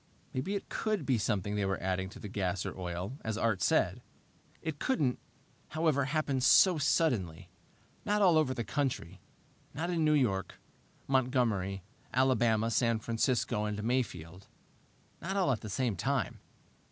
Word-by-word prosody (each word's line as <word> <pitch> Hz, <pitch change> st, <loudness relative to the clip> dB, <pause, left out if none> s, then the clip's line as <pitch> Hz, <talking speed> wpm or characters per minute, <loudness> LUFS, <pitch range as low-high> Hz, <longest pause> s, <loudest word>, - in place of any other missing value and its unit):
Maybe 155 Hz, +11 st, -2 dB
it 200 Hz, -, -4 dB
could 215 Hz, -8 st, -2 dB
be 130 Hz, -4 st, +2 dB
something 105 Hz, -2 st, -1 dB
they 105 Hz, -1 st, 0 dB
were 95 Hz, 0 st, -1 dB
adding 95 Hz, 0 st, -2 dB
to -, -, -12 dB
the -, -, -7 dB
gas 95 Hz, -2 st, -2 dB
or -, -, -4 dB
oil, 90 Hz, -, -5 dB
as 110 Hz, -1 st, -2 dB
Art 110 Hz, -5 st, 0 dB
said. -, -, +2 dB, 0.6 s
It 160 Hz, -3 st, -5 dB
couldn't, 145 Hz, -, 0 dB, 0.5 s
however, 155 Hz, -4 st, +1 dB
happen 140 Hz, -2 st, 0 dB
so 175 Hz, +6 st, +6 dB
suddenly 125 Hz, -, 0 dB, 0.5 s
not 210 Hz, 0 st, +1 dB
all 185 Hz, -5 st, +5 dB
over 150 Hz, -5 st, +2 dB
the 120 Hz, -, -2 dB
country. 105 Hz, -, -3 dB, 0.5 s
Not 170 Hz, +4 st, -2 dB
in 165 Hz, -2 st, +1 dB
New 155 Hz, 0 st, +4 dB
York, 100 Hz, -9 st, 0 dB, 0.5 s
Montgomery, 120 Hz, -8 st, +1 dB, 0.3 s
Alabama, 120 Hz, -4 st, +3 dB
San 115 Hz, +1 st, +2 dB
Francisco, 115 Hz, -1 st, 0 dB
and 105 Hz, 0 st, -3 dB
Mayfield. 100 Hz, -7 st, -2 dB, 0.7 s
Not 195 Hz, +3 st, -3 dB
all 185 Hz, -8 st, +3 dB
at 120 Hz, -, -1 dB
the 110 Hz, -, -7 dB
same 120 Hz, 0 st, 0 dB
time. 135 Hz, +3 st, -1 dB
120 Hz, 155 wpm, -31 LUFS, 100-145 Hz, 0.7 s, so